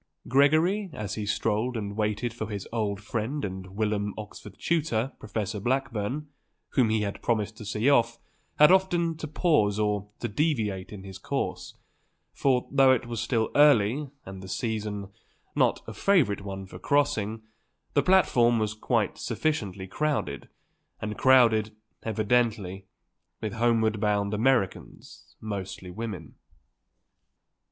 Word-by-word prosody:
Gregory, 155 - +3
as 105 -1 -4
he 105 -2 -4
strolled 110 +3 0
and 100 -2 -4
waited 105 +2 -1
for 110 -2 -5
his 100 -3 -5
old 105 -4 -1
friend 115 +5 -3
and 95 0 -7
whilom 105 -2 -1
Oxford 105 -2 -9
tutor, 135 -7 0
Professor 105 -1 -3
Blackburn, 125 +3 -1 0.4
whom 125 -4 +2
he 110 0 +1
had 100 -1 -3
promised 110 -2 0
to 110 - -9
see 105 +4 -1
off, 115 -5 +4 0.4
had 150 +3 +8
often 175 -3 +3
to 155 0 -6
pause 150 - +2
or 105 -1 0
to - - -2
deviate 110 - -1
in 100 -3 -8
his 95 -1 -9
course; - - -3 0.6
for, 130 -3 +1
though 135 -1 +6
it 130 -3 +2
was 120 -1 -4
still 115 -2 0
early, 140 -1 +4 0.2
and 95 0 -8
the 95 - -9
season 105 -2 -3 0.5
not - - +2
a - - -7
favourite 145 - +2
one 95 -1 -6
for 95 - -11
crossing, 115 -7 0 0.5
the 145 - +4
platform 125 -9 +4
was 110 -1 0
quite 110 - -1
sufficiently 105 - -2
crowded, 105 - -2 0.5
and 105 0 -4
crowded, 115 -5 +4 0.3
evidently, 110 -3 0 0.5
with 110 -3 -4
homeward 110 -2 +2
bound 105 -1 +1
Americans, 115 -2 -1
mostly 95 -3 -6
women. 100 -6 -6
110 Hz, 135 wpm, -27 LUFS, 105-130 Hz, 0.6 s, had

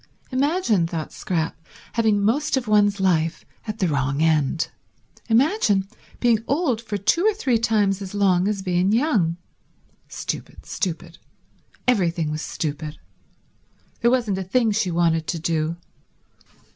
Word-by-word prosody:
Imagine, 260 - +1
thought 165 -2 -5
Scrap, 165 -3 -2 0.4
having 220 -3 +2
most 280 +7 +1
of 250 -3 -3
one's 205 -1 +3
life 165 -4 +1 0.2
at 215 0 -4
the 185 - +1
wrong 140 -2 0
end. 160 -1 +2 0.6
Imagine 225 - +3 0.3
being 230 -3 +2
old 280 -6 +1
for 220 -3 -4
two 215 - +2
or 435 0 +3
three 255 - +1
times 205 -3 +1
as 195 +1 -6
long 190 -2 +3
as 205 -2 -2
being 180 +1 +1
young. 215 - +2 0.7
Stupid, - - -6
stupid. 170 -2 -4 0.7
Everything 170 -9 +1
was 155 0 -3
stupid. 150 0 -4 1.0
There 235 - +3
wasn't 235 -6 +1
a - - -2
thing 225 +4 +1
she 205 -3 0
wanted 165 -2 +1
to 175 - -1
do. 165 0 -1
195 Hz, 135 wpm, -23 LUFS, 165-230 Hz, 1.0 s, one's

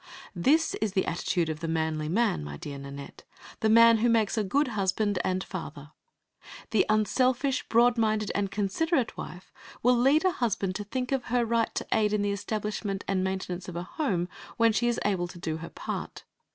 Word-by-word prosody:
This 295 - +3
is 215 -3 0
the 190 - +1
attitude 175 0 -1
of 155 -1 -4
the 165 - -4
manly 160 -1 -1
man, 210 - +1
my 75 0 -7
dear 140 - -7
Nanette, 140 0 -9 0.4
the 220 - +2
man 230 0 +7
who 240 +2 +3
makes 225 -3 +2
the 220 - +1
good 270 +8 +1
husband 205 -1 0
and 185 0 0
father. 150 -5 -8 0.8
The 220 -3 +3
unselfish, 255 +5 +1
broad 235 +1 +4
minded 215 -2 +1
and 200 -1 0
considerate 240 - 0
wife 180 +1 -9 0.3
will 250 +1 +5
lead 275 +8 +3
a 370 - +4
husband 215 - -1
to 205 - -5
think 250 +4 -3
of 265 -3 0
her 245 0 +1
right 230 0 0
to - - -2
aid 210 -1 +2
in 210 -1 +1
the 205 - 0
establishment 205 -1 -3
and 190 -1 0
maintenance 185 -1 -3
of 175 - -8
a 175 - -3
home 180 - -1 0.3
when 230 -1 +4
she 220 +3 +1
is 240 - +1
able 185 -4 +1
to 175 - -11
do 160 -2 -3
her 165 +1 -8
part. - - -6
210 Hz, 195 wpm, -28 LUFS, 180-235 Hz, 0.8 s, man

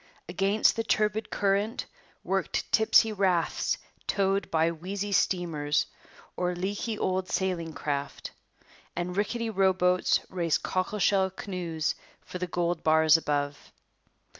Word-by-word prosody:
Against 195 +5 +2
the 225 - -1
turbid 215 0 0
current 205 +3 0 0.4
worked - - -2
tipsy 220 0 +5
rafts 185 -4 +1 0.3
towed 195 -2 +1
by 165 +1 +2
wheezy 195 +5 -4
steamers 160 -6 +1 0.5
or 180 0 -1
leaky 200 +5 -3
old 185 -1 -1
sailing 180 -3 -1
craft, 145 -2 -4 0.6
and 180 +1 -3
rickety 225 +3 -1
row 190 -2 +3
boats 180 0 +2
raced 170 -4 0
cockle 185 +3 -1
shell 195 -1 +3
canoes 175 -4 -3 0.3
for 180 - -8
the 180 - -2
gold 175 -1 -1
bars 160 0 +5
above. 145 -2 -1
185 Hz, 120 wpm, -28 LUFS, 165-200 Hz, 0.6 s, tipsy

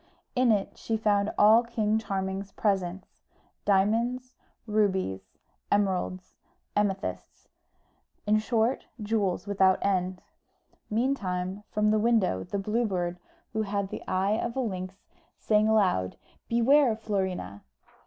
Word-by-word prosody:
In 250 -2 +4
it 205 -2 -1
she 225 - -1
found 205 -1 +1
all 215 +3 +7
King 220 -2 0
Charming's 195 -1 -3
presents 190 -3 -1 0.6
diamonds, 230 +6 +1 0.3
rubies, 190 - -1 0.3
emeralds, 185 -2 0 0.4
amethysts 200 -1 -2 0.8
in 210 +1 +3
short, 225 +2 0
jewels 205 -4 -1
without 190 -2 +3
end. 185 -2 0 0.7
Meantime, 200 -6 -1
from 210 0 +2
the 215 - +3
window 210 - +2
the 200 - -4
Blue 215 +4 0
Bird, 175 -2 -2 0.3
who 220 - 0
had 200 -2 -2
the - - -6
eye 195 +4 +1
of 235 - -3
a - - -1
lynx, 190 -6 -3 0.4
sang 215 0 +2
aloud, 185 - +2 0.3
"Beware, 240 +1 +4
Florina!" 190 - -3
205 Hz, 115 wpm, -28 LUFS, 190-220 Hz, 0.8 s, all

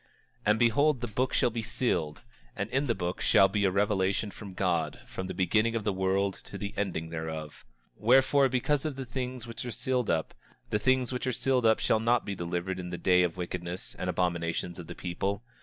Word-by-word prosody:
27:7 - - -34 0.4
And 105 +1 +5
behold 130 +5 +4
the 120 - -2
book 125 +4 -1
shall - - +3
be 115 0 -2
sealed; 80 - -1 0.3
and - - -3
in 135 +2 +1
the 115 - +1
book 90 -1 -3
shall 95 - +6
be 100 +1 0
a - - +4
revelation 100 +1 +1
from 100 -3 -10
God, 85 -5 0
from 95 - -5
the - - -4
beginning 110 +5 +2
of 115 - -1
the 105 -1 0
world 95 +1 0
to - - -7
the 100 0 -5
ending 85 -5 -2
thereof. 80 -2 -5 0.4
27:8 - - -19
Wherefore, 135 +3 +5
because 135 +3 +1
of 155 -3 -2
the 135 -1 -5
things 125 0 -4
which 115 -1 -7
are 125 - -4
sealed 125 0 -1
up, 80 -1 0 0.4
the 105 - +2
things 130 +2 +2
which 125 +1 -3
are - - +2
sealed 125 -2 +3
shall 110 - +2
not 115 +1 +2
be 100 - -3
delivered 90 +1 -3
in 90 -1 -5
the 90 - -4
day 90 0 +4
of 90 -2 +1
the - - -21
wickedness 90 0 -5
and - - -2
abominations 85 0 -1
of 85 - -8
the 85 - -7
people. 95 +4 -3
100 Hz, 225 wpm, -29 LUFS, 90-120 Hz, 0.4 s, shall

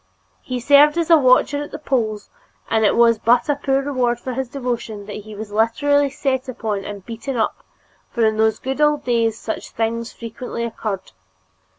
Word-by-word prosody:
He 250 -1 -4
served 290 +5 +5
as 335 0 0
a 330 - +9
watcher 270 +1 +3
at 290 - -6
the - - -7
polls 225 -8 -2 0.4
and 220 -1 +3
it 210 - +3
was 230 -2 +4
but 240 +5 +3
a 290 - +2
poor 275 -1 0
reward 250 -4 0
for 255 +1 -5
his 260 0 -3
devotion 235 -6 -4
that 205 - -7
he 210 0 -10
was 210 0 -7
literally 280 +7 +2
set 265 -1 -2
upon 215 -5 -3
and 200 -2 -8
beaten 240 +3 -5
up, 220 - -1 0.5
for 235 -3 +1
in 220 0 +1
those 220 0 +2
good 265 +3 -4
old 295 -1 +3
days 230 -3 +1
such 220 - -5
things 230 +1 -2
frequently 235 +1 -6
occurred. 215 -4 -4
240 Hz, 190 wpm, -20 LUFS, 220-275 Hz, 0.5 s, a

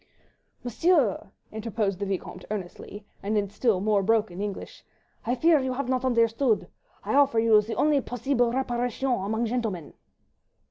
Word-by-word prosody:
"Monsieur," 250 - +1 0.2
interposed 215 -3 -2
the 200 - -2
Vicomte 190 -2 -5
earnestly, 205 +1 -7 0.2
and 210 +2 -1
in 200 -1 -1
still 205 -1 +1
more 205 0 +2
broken 210 -3 0
English, 205 -1 -6 0.4
"I 245 - +1
fear 320 +4 +4
you 260 -1 -2
have 260 0 -3
not 255 -1 0
understand. 230 -1 +2 0.4
I - - -2
offer 280 -4 +4
you 225 -1 +5
the 220 +2 -5
only 295 -2 +2
posseeble 245 0 0
reparation 245 0 -1
among 220 +1 -1
gentlemen." 220 -9 -3
230 Hz, 145 wpm, -26 LUFS, 205-255 Hz, 0.4 s, you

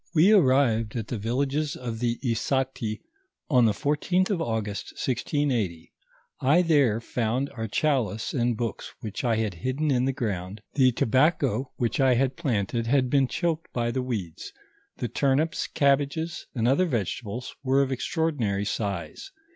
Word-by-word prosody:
We 170 +7 +6
arrived 130 - +3
at 115 -3 -4
the 120 - -3
villages 140 +7 -1
of 115 -3 -5
the 120 -1 0
Issati 120 -1 -1 0.5
on 125 -4 +5
the 110 - +4
14th 150 - 0
of 180 -4 0
Au 110 -8 0
gust, 100 -2 -6
1680. 120 - -1 0.5
I 150 +7 +4
there 140 -10 +3
found 120 +3 -1
our 110 -2 -4
chalice 110 -4 0
and 120 -3 +1
books 115 -1 -4
which 110 +2 -5
I 120 -3 +2
had 110 -2 -1
hidden 130 - -1
in 125 -1 +2
the 135 - +2
ground; 100 -6 -4
the 130 -3 +4
tobacco 130 0 +1
which 120 +5 -1
I 130 -2 +4
had 130 +1 +1
planted, 115 - -1
had 130 0 +2
been 135 -2 +4
choked 165 +2 -2
by 120 -1 0
the 130 - -1
weeds; 105 -10 -5 0.5
the 120 - -2
turnips, 140 - 0
cabbages, 145 +4 0
and 115 -1 +1
other 140 +9 +3
vegetables 120 - -3
were 135 +1 +3
of 135 - -3
extraordinary 130 - -1
size. 100 - -4
125 Hz, 155 wpm, -26 LUFS, 110-140 Hz, 0.5 s, We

